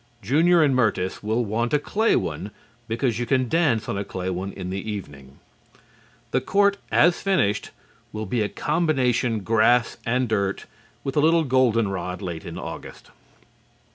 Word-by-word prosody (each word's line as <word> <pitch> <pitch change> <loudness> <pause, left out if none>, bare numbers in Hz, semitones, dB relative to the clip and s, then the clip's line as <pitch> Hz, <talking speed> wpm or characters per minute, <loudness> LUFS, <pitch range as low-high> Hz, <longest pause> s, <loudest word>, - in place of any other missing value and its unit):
Junior 160 - +4
and 140 -3 +3
Myrtis 105 -6 0
will 110 +3 0
want 115 +6 0
a - - +5
clay 215 +9 +1
one 100 - -2 0.4
because 115 0 -1
you 120 - -2
can 130 +1 +2
dance 145 -6 +1
on 100 - -2
a - - -2
clay 95 -1 -4
one 95 +2 -4
in 90 -1 -6
the 95 +3 -4
evening. 70 -9 -9 0.9
The - - +1
court 200 0 +2
as 175 0 +4
finished 185 - +1 0.4
will 110 0 -4
be 115 +3 -1
a 105 - 0
combination 130 -8 0
grass 115 +3 +2
and 125 +2 0
dirt, 100 -3 -1 0.4
with 135 - -4
a - - +5
little 165 +2 +4
golden 125 -5 +2
rod 90 -1 -4
late 85 -5 -6
in - - -7
August. - - -9
115 Hz, 165 wpm, -24 LUFS, 100-140 Hz, 0.9 s, a